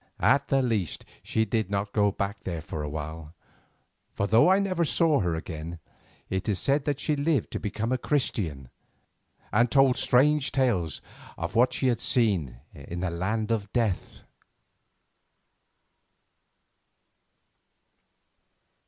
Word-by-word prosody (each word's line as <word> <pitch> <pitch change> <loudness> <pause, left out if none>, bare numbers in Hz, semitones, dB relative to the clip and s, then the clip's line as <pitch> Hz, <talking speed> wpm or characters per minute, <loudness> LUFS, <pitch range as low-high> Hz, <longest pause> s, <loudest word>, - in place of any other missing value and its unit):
At 140 - +4
the 135 -1 +2
least 105 - -1 0.2
she 110 - 0
did 110 -2 -1
not 100 0 -2
go 100 -1 +3
back 100 +2 -4
there 85 -4 -4
for 80 - -5
a 75 - -4
while, 80 +2 -7 0.8
for 100 - 0
though 110 - +5
I 190 - +5
never 185 -3 0
saw 160 -1 +3
her 90 -5 0
again, 80 0 -6 0.5
it 95 +2 -2
is 100 - +1
said 140 +7 +1
that 145 -2 -1
she 150 - 0
lived 145 -3 0
to - - -3
become 110 +3 -3
a 130 - +1
Christian 90 - -1 0.8
and 115 +3 +4
told 135 -1 +4
strange 145 +2 +3
tales 120 - 0 0.4
of - - -4
what 125 +2 +4
she 130 - -1
had 120 -3 +2
seen 100 - +1 0.2
in 85 +5 -7
the 90 -2 -1
land 105 +6 -2
of 105 -3 -1
Death. 110 -7 -1
110 Hz, 135 wpm, -27 LUFS, 90-130 Hz, 0.8 s, though